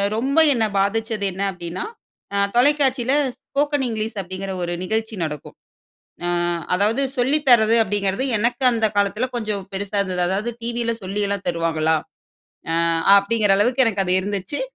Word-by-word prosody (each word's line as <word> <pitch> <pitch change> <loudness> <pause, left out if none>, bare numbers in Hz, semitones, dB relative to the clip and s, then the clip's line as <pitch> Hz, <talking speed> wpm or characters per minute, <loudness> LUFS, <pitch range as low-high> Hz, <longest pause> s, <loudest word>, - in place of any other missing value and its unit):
ரொம்ப 265 +6 -1 0.2
என்னை 225 -3 +1
பாதிச்சது 215 +1 0
என்ன 190 +2 -6
அப்படின்னா, 175 -1 -6 0.5
அ - - +2 0.2
தொலைக்காட்சியில 265 -1 +2 0.3
"Spoken 290 0 -1
English" 220 -1 -3
அப்படிங்கிற 190 +1 -6
ஒரு 175 0 -2
நிகழ்ச்சி 220 +3 -2
நடக்கும். 150 -3 -6 0.7
அ - - 0 0.5
அதாவது 210 +8 +1 0.2
சொல்லி 265 +5 +2
தர்றது 225 -2 +6
அப்படிங்கிறது, 205 +3 -1
எனக்கு 240 +4 -1
அந்த 225 -2 +1
காலத்தில 205 +5 +1
கொஞ்சம் 210 -4 -2
பெருசா 200 +1 -3
இருந்தது. 185 -2 -2
அதாவது 200 +6 -1
டிவியில் 235 -1 -2
சொல்லியல்லாம் 200 0 -2
தருவாங்களா, 165 -2 +1 0.8
அ - - +1 0.4
அப்படிங்கிற 205 0 +1
அளவுக்கு 245 +5 +3
எனக்கு 200 -3 0
அது 180 - +2
இருந்துச்சு. 200 +6 -4
210 Hz, 140 wpm, -21 LUFS, 190-235 Hz, 0.8 s, தர்றது